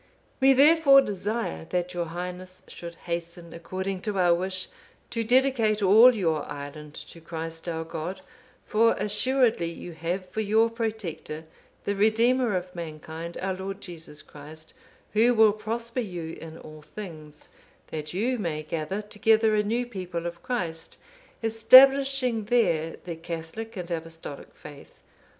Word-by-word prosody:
"We 270 0 +6
therefore 280 0 +7
desire 205 - -3
that 180 0 -2
your 175 -1 -2
Highness 180 +2 -7
should 170 -1 -9
hasten, 170 0 -5
according 185 +3 -4
to 210 -3 -3
our 175 -2 +4
wish, 185 +1 -2 0.4
to 230 -1 -1
dedicate 235 -3 +2
all 225 +6 +7
your 165 -7 0
island 145 +1 -8
to 165 - -11
Christ 165 +1 -6
our 160 -1 -3
God; 165 +3 -6 0.4
for 230 +2 +3
assuredly 215 -3 +1
you 175 - -9
have 170 +3 -4
for 215 +4 -3
your 220 +2 +3
Protector, 215 -9 -4 0.4
the 200 - -1
Redeemer 225 +2 +3
of 180 0 -6
mankind, 165 0 -7
our 190 0 0
Lord 190 +1 -6
Jesus 165 -5 -8
Christ, 155 +2 -12 0.4
Who 235 +3 +4
will 220 -2 +6
prosper 230 +3 -4
you 175 -8 -5
in 160 0 -9
all 155 -1 -12
things, 155 -4 -10 0.4
that 155 -1 -5
you 235 +7 -1
may 155 -6 -2
gather 165 +6 -3
together 215 +1 +2
a 210 - +3
new 230 +4 -1
people 180 -7 -5
of 170 0 -5
Christ, 175 -11 -4 0.5
establishing 255 +1 +6
there 170 -9 +1
the 170 -2 -5
Catholic 170 +7 -7
and 180 -1 -6
Apostolic 165 -3 -7
faith. 145 -2 -13
185 Hz, 140 wpm, -26 LUFS, 165-225 Hz, 0.5 s, therefore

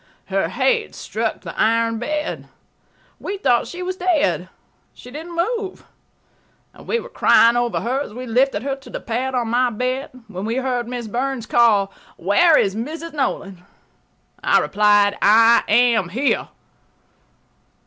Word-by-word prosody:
Her - - 0
head 470 -3 0
struck - - -3
the - - -8
iron 230 0 +2
bed. 300 +5 -3 0.7
We 400 - -5
thought 250 -10 +1
she 360 +1 -7
was 370 +1 -4
dead. 350 -5 0 0.5
She 250 - -13
didn't 325 +5 -8
move. 395 +3 -2 1.0
We 470 - -2
were - - -9
crying 235 - +4
over 240 -1 0
her 250 +4 -1
as 285 - -6
we 250 +4 -7
lifted 250 -2 +1
her 275 0 -2
to 270 - -15
the - - -5
pad 255 +3 -3
on 240 -2 -1
my 245 +2 +2
bed, 255 +5 -3 0.2
when 195 -1 -6
we 225 +2 -2
heard 255 -2 -2
Miss 240 -2 -5
Burns 250 +2 -3
call: 210 -5 +3 0.2
"Where 300 - +4
is 195 0 +1
Mrs. 315 +8 -6
Nolan?" 195 -10 -3 0.8
I - - +4
replied, 205 0 +3
"I 225 +3 +6
am 225 -4 +3
here." 260 +9 0
245 Hz, 150 wpm, -20 LUFS, 225-300 Hz, 1.0 s, I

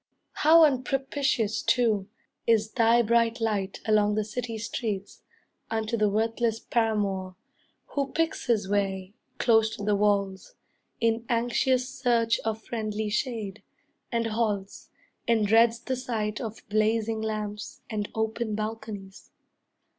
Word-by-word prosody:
How 325 +2 +6
unpropitious, 270 -4 0
too, 215 -5 +2 0.4
Is 220 -1 +3
thy 235 0 +4
bright 230 +1 +2
light 205 -4 -1
along 210 -1 +3
the 215 - +1
city 225 +2 -4
streets, 215 -3 -4 0.5
Unto 220 +1 -1
the 215 -2 +2
worthless 225 +2 0
paramour, 200 -6 -1 0.5
who 280 -1 -2
picks 325 -4 -1
His 215 -5 +2
way, 195 -1 -1 0.2
close 220 -2 +3
to 205 - -7
the 205 0 +2
walls, 200 -2 0 0.4
in 230 0 +1
anxious 245 +2 +1
search 230 -3 +1
Of 220 0 -3
friendly 215 -2 -3
shade, 220 -4 -2 0.5
and 230 -1 0
halts, 215 -3 -2 0.4
and 225 -2 +3
dreads 230 +2 +4
the 260 +2 -3
sight 225 -4 -3
Of 225 -2 -7
blazing 220 +1 +1
lamps, 215 -1 -4
and 210 -2 -3
open 220 0 -1
balconies. 215 -3 -6
220 Hz, 125 wpm, -27 LUFS, 210-235 Hz, 0.5 s, How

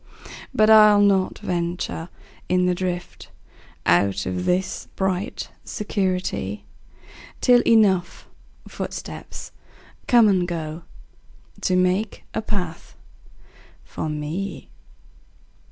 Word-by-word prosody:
But 215 0 +4
I'll 215 -1 +8
not 195 -2 +2
venture 175 -1 -3 0.4
in 180 0 +3
the 180 - +2
driftOut 100 - -2
of 90 -1 -3
this 185 +1 -1
bright 190 +2 -2
security, 185 - -2 0.7
Till 245 -1 +5
enough 200 -6 +3 0.4
footsteps - - -7 0.6
come 235 -3 +6
and 185 -3 +2
goTo 170 +2 -6
make 185 +4 0
a - - -1
path 180 -7 -5 0.9
for 155 - -5
me. 155 +6 -5
180 Hz, 85 wpm, -23 LUFS, 165-200 Hz, 0.9 s, I'll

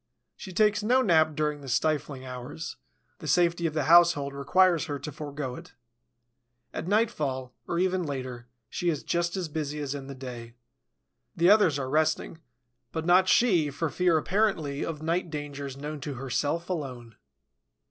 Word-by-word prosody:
She 190 - -9
takes 210 +2 +3
no 250 +5 +3
nap 160 -6 +3
during 150 -1 -1
the 135 - -8
stifling 140 -1 -1
hours: 130 +5 -7 0.4
the 155 - -8
safety 170 +2 +2
of 155 - -5
the 155 - +1
household 165 -3 +5
requires 170 +5 +3
her 145 - -3
to 140 +2 -7
forego 145 -2 -5
it. - - -11 1.0
At 160 - -4
nightfall, 150 - 0
or 170 - -2
even 185 +1 +1
later, 130 -6 -5 0.2
she 175 - -1
is 155 -4 -2
just 170 +2 -1
as 180 -3 -2
busy 150 -1 -4
as 145 -2 -3
in 140 -2 -7
the 140 - -7
day. 120 -3 -8 0.8
The 175 +3 +5
others 205 -9 +5
are 135 -2 -3
resting, 155 +3 0 0.5
but 160 -1 -3
not 185 +2 +5
she, 180 -12 +4
for 145 +2 -3
fear, 180 -3 +3
apparently, 160 -5 0
of 155 -2 -5
night 170 +2 0
dangers 145 -3 -6
known 150 +1 -6
to 140 0 -5
herself 145 +6 -2
alone. 130 - -5
155 Hz, 165 wpm, -28 LUFS, 140-175 Hz, 1.0 s, household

